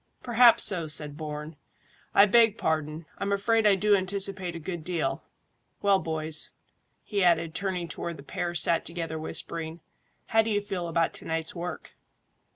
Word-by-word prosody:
"Perhaps 240 -1 +6
so," 175 -6 +5
said 150 -1 +1
Bourne. 150 0 -7 0.6
"I 200 - +8
beg 225 +1 +4
pardon; 155 0 -2
I'm 200 - -2
afraid 215 +2 +2
I 200 - +5
do 205 +2 +3
anticipate 190 -2 -2
a - - -5
good 170 0 -6
deal. 175 0 -2 0.6
Well, 200 -1 +4
boys," 160 -2 -3 0.5
he 200 -3 -1
added, 165 -2 +2
turning 185 -3 -3
to - - -8
where 170 - -3
the 140 - -12
pair 175 +4 -4
sat 165 +1 +3
together 165 -2 -4
whispering, 160 +1 -5 0.5
"how 225 - +3
do 225 - -3
you 205 -1 +1
feel 190 -4 -4
about 165 0 0
to - - -9
night's 160 0 -3
work?" 175 -2 -7
175 Hz, 165 wpm, -27 LUFS, 160-200 Hz, 0.6 s, I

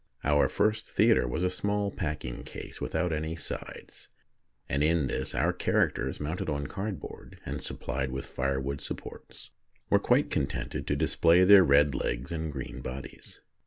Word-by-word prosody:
Our 75 0 +3
first 110 +1 0
theatre - - +4
was 80 +8 -2
a 90 - +3
small 100 +2 -1
packing 75 -9 -4
case - - -9
without 90 -2 -1
any 80 +1 -2
sides, 85 - -7 0.6
and 70 +3 0
in 80 -1 +3
this 65 - -3
our - - +2
characters, 65 +2 0
mounted 80 +4 -3
on 70 -1 -2
cardboard 100 +5 -6
and - - -4
supplied 65 - -3
with 65 +1 -4
firewood 70 +1 -2
supports, - - -8 0.4
were - - +6
quite - - +2
contented 65 -1 -2
to - - +1
display 85 +2 +4
their 95 0 +9
red 70 -1 +5
legs 65 +1 -2
and 80 -2 -3
green 65 -3 -6
bodies. 65 +1 -8
75 Hz, 155 wpm, -29 LUFS, 65-90 Hz, 0.6 s, their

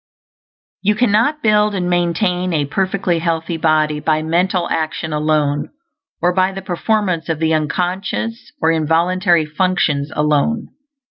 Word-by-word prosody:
You 210 +1 +2
cannot 245 +7 +2
build 210 -1 +3
and 180 -2 -1
maintain 180 +1 0
a 150 -2 +1
perfectly 185 +2 -1
healthy 165 0 -2
body 155 -1 +1
by 155 0 0
mental 175 +2 +1
action 160 0 -2
alone, 150 -1 0 0.5
or 180 +1 +3
by 185 +1 +2
the 195 0 -7
performance 185 -2 -1
of 165 - 0
the 160 0 +1
unconscious 185 - -2
or 160 0 +2
involuntary 170 +2 +2
functions 155 -3 0
alone. 150 +10 +1
175 Hz, 130 wpm, -18 LUFS, 155-190 Hz, 0.5 s, build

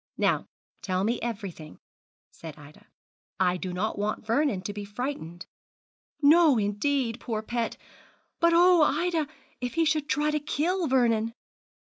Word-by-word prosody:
'Now - - +1 0.3
tell 185 -1 -1
me 235 +4 0
everything,' 195 -9 -6 0.5
said 160 -3 -10
Ida; 145 0 -16 0.5
'I 180 -1 +2
did 180 0 -5
not 205 +3 -2
want 210 +1 -2
Vernon 230 -4 +1
to 205 - -4
be 205 0 -6
frightened.' 200 - -5 0.8
'No, 305 -2 +6
indeed, 230 +4 0
poor 220 -3 -3
pet. 235 0 -2 0.6
But 335 0 +4
oh! 355 0 +6
Ida, 320 +1 +1 0.3
if 245 +2 -4
he 330 0 +3
should 310 -1 0
try 300 +1 +1
to 300 - 0
kill 325 +4 -1
Vernon!' 230 -4 +2
235 Hz, 140 wpm, -27 LUFS, 205-300 Hz, 0.8 s, No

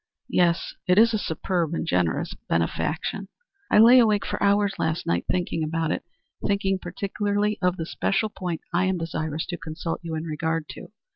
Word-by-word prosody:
"Yes. 170 -1 +2
It 180 +1 +4
is 225 +1 +6
a 215 - +1
superb 170 -2 -1
and - - -2
generous 90 - 0 0.2
benefaction." 160 - -1 0.4
"I - - +4
lay 235 +4 +9
awake 215 -4 +3
for - - -3
hours 200 0 +3
last 160 0 -1
night 85 0 0
thinking 175 -3 0
about 160 0 -1
it; - - -2 0.4
thinking 195 -1 +1
particularly 205 +3 -1
of 180 0 +1
the 165 - -3
special 205 +5 0
point 180 -5 -4
I 180 +2 +3
am 190 -1 +1
desirous 160 -1 -3
to 175 - -5
consult 160 +1 -4
you 165 -2 -4
in 155 - -3
regard 160 0 -2
to. - - -9
175 Hz, 180 wpm, -25 LUFS, 160-200 Hz, 0.4 s, lay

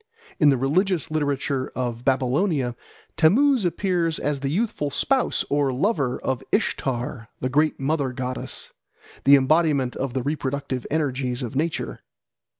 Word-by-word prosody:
In 150 - +6
the 135 - +3
religious 165 +6 +1
literature 140 -3 -1
of 120 -2 -3
Babylonia 135 0 +1 0.4
Tammuz 245 - +4
appears 175 -3 0
as 145 -1 -1
the 135 0 -2
youthful 175 -4 -1
spouse 265 - +1
or 140 -1 +1
lover 135 - 0
of 130 -3 -2
Ishtar, 125 - -1
the 130 - -1
great 150 +3 +2
mother 140 -1 0
goddess, 125 0 -5 0.5
the 140 +1 +9
embodiment 140 -2 +2
of 135 -1 -3
the 130 - 0
reproductive 140 -3 -3
energies 135 -4 -1
of 120 +2 -5
nature. 145 - -2
140 Hz, 135 wpm, -24 LUFS, 130-160 Hz, 0.5 s, the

